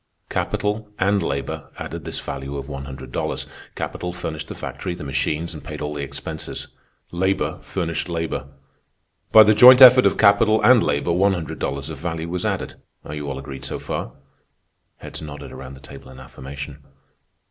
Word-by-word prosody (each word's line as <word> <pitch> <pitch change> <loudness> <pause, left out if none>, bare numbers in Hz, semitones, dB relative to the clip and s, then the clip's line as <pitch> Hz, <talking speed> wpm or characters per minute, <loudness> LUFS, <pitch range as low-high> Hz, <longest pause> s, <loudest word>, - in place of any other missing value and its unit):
"Capital 105 +1 -1
and 100 +1 +2
labor 70 -4 -3
added - - -6
this - - -4
value 70 +1 -5
of 70 0 -6
one 70 -2 -6
hundred 65 -1 -9
dollars. - - -2 0.3
Capital 90 - -4
furnished 80 -3 -5
the - - -7
factory, 90 - -5
the - - -8
machines, 75 +4 -1
and 75 - -9
paid 75 -1 -7
all 75 0 -3
the 75 - -4
expenses. 70 0 -6 0.4
Labor 95 +2 0
furnished 85 -2 -3
labor. 80 -4 -3 0.8
By 110 - +10
the 110 +1 +5
joint 125 +4 +9
effort 130 -1 +10
of - - 0
capital 110 +1 +5
and 125 -2 +7
labor 70 0 0
one 95 +3 +3
hundred 85 -4 -5
dollars 70 +2 -3
of 75 - -8
value 80 -1 -4
was 90 0 -2
added. - - -4 0.2
Are 75 - -7
you 75 -1 -4
all 70 - -4
agreed 70 0 -8
so 65 - -3
far?" - - -5 0.8
Heads - - -8
nodded 75 -2 -8
around 65 0 -9
the - - -13
table 70 -1 -12
in 65 0 -12
affirmation. 70 +2 -9
75 Hz, 180 wpm, -22 LUFS, 70-95 Hz, 0.8 s, By